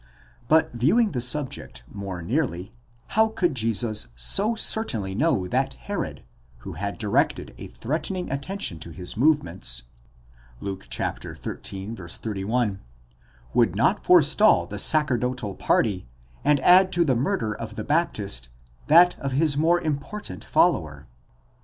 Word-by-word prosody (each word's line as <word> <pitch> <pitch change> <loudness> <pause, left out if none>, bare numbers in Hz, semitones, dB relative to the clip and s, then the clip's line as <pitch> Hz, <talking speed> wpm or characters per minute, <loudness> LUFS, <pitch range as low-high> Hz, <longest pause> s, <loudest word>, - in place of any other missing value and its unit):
—But 160 0 +3
viewing 170 - +2
the 125 -5 -3
subject 130 - -2
more 95 -1 -7
nearly, 110 - -2 0.4
how 220 +1 +3
could 180 -7 -1
Jesus 115 - 0
so 195 - +2
certainly 120 - 0
know 120 - +1
that 90 - -1
Herod, - - -5 0.4
who - - -6
had 100 +5 -5
directed 105 -2 0
a - - -7
threatening 170 - -4
attention 140 - -3
to 80 - -7
his 90 +2 -6
movements 110 - 0 0.8
(Luke 95 -1 -6
xiii, - - -4
31), 105 +1 -4 0.7
would - - +2
not - - +1
forestall 85 - +5
the 100 +3 -5
sacerdotal 125 -6 +3
party, 95 - 0 0.4
and 145 -1 +3
add 185 +4 +6
to 170 -1 +2
the 135 -4 +2
murder 115 -3 -1
of 110 +1 -8
the - - -4
Baptist, 100 - -1 0.4
that 175 +4 +6
of 135 -1 -3
his 145 +1 +3
more 165 +4 +3
important 150 - -5
follower? - - +1
125 Hz, 130 wpm, -24 LUFS, 100-160 Hz, 0.8 s, add